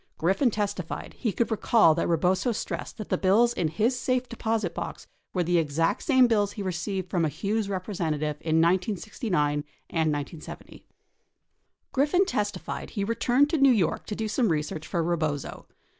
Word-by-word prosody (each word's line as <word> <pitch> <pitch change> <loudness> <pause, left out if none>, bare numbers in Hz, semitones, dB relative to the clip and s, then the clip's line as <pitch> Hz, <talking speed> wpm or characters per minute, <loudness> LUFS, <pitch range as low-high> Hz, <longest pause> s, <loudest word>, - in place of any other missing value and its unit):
Griffin 190 - +2
testified 200 -5 -3
he 230 - -2
could 235 +4 -1
recall 220 -5 +4
that. 165 - -1
Rebozo 180 +7 +2
stressed - - -5
that 215 - -7
the - - 0
bills 225 +6 +4
in 175 - 0
his 215 +11 +1
safe 255 +1 0
deposit 225 -2 -2
box - - -6 0.3
were 180 - 0
the 175 0 +2
exact 160 +1 0
same 260 -4 +5
bills 205 -4 +2
he 205 - -5
received 185 +1 -3
from 175 -2 +1
a 155 - +2
Hughes 200 +7 -2
representative 165 -6 -2
in 160 -1 0
1969 180 - 0 0.3
and 160 -2 +1
1970. 145 +2 -6
31 - - -28 1.0
Griffin 295 +8 +3
testified 210 - -3
he 200 - -3
returned 240 +6 +2
to 320 - +1
New 275 0 +6
York 200 -9 +1
to 210 - -3
do 220 +1 -2
some 220 +1 +1
research 155 0 -2
for 170 -2 -1
Rebozo. 155 -4 -2
195 Hz, 170 wpm, -27 LUFS, 165-225 Hz, 1.0 s, New